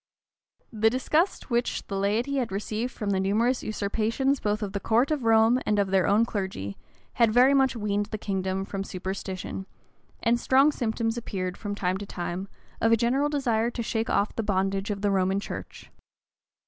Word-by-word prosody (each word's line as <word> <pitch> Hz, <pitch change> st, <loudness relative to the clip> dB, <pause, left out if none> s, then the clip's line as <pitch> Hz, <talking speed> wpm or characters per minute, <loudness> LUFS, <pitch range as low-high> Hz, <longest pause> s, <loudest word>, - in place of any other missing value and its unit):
The 220 Hz, 0 st, +3 dB
disgust 300 Hz, -, 0 dB
which 240 Hz, +1 st, 0 dB
the 200 Hz, -, -5 dB
laity 220 Hz, +8 st, 0 dB
had 245 Hz, -6 st, -1 dB
received 215 Hz, +5 st, -3 dB
from 210 Hz, -5 st, -3 dB
the 190 Hz, -, +1 dB
numerous 225 Hz, +6 st, +1 dB
usurpations 225 Hz, +6 st, 0 dB
both 210 Hz, +1 st, -1 dB
of 195 Hz, -2 st, -4 dB
the 200 Hz, -, -1 dB
court 235 Hz, +8 st, +2 dB
of 290 Hz, -6 st, -1 dB
Rome 225 Hz, +2 st, +5 dB
and 210 Hz, -, +1 dB
of 200 Hz, -2 st, +1 dB
their 190 Hz, -2 st, +3 dB
own 210 Hz, +3 st, +4 dB
clergy, 190 Hz, -, -4 dB, 0.4 s
had 230 Hz, -2 st, +3 dB
very 250 Hz, +4 st, +6 dB
much 270 Hz, -2 st, +3 dB
weaned 205 Hz, -2 st, -1 dB
the 215 Hz, -, -4 dB
kingdom 190 Hz, -1 st, -2 dB
from 195 Hz, 0 st, -4 dB
superstition; 190 Hz, 0 st, -5 dB, 0.6 s
and 235 Hz, 0 st, +3 dB
strong 270 Hz, +5 st, +4 dB
symptoms 230 Hz, -3 st, -1 dB
appeared, 185 Hz, -5 st, -4 dB
from 205 Hz, -1 st, -5 dB
time 185 Hz, -2 st, -1 dB
to 205 Hz, -, -7 dB
time, 180 Hz, +1 st, -4 dB, 0.3 s
of 225 Hz, -, +3 dB
a 230 Hz, -, +6 dB
general 265 Hz, +6 st, +1 dB
desire 240 Hz, -6 st, +1 dB
to 235 Hz, -1 st, -4 dB
shake 225 Hz, 0 st, -2 dB
off 205 Hz, -, +1 dB
the -, -, 0 dB
bondage 195 Hz, -1 st, 0 dB
of 200 Hz, -1 st, -3 dB
the 205 Hz, -, +2 dB
Romish 190 Hz, +1 st, +1 dB
church. -, -, -8 dB
215 Hz, 185 wpm, -27 LUFS, 195-240 Hz, 0.6 s, very